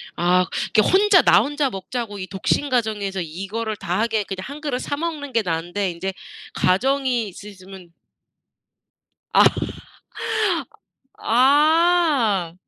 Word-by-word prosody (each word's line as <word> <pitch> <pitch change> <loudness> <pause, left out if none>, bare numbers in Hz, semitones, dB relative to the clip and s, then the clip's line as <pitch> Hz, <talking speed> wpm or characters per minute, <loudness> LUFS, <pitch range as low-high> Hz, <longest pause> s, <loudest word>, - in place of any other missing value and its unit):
아 180 +1 +2 0.3
이렇게 215 - +6
혼자 390 -2 +5
나 - - +5
혼자 290 -1 -1
먹자고 205 +1 -5
이 185 - -6
독신 200 +9 -1
가정에서 210 -6 -1
이거를 195 +7 -5
다 180 0 -3
하게 220 -2 0
그냥 195 -1 -7
1 290 +2 -9
그릇 270 -5 -2
사 285 - -4
먹는 305 -4 -5
게 230 - +2
나은데 175 +3 -2
인제 190 +3 -5 0.4
가정이 250 +4 +1
있으시면 190 -2 -13 1.4
아 - - +6 1.7
아 285 - +3
220 Hz, 225 characters per minute, -21 LUFS, 190-280 Hz, 1.7 s, 이렇게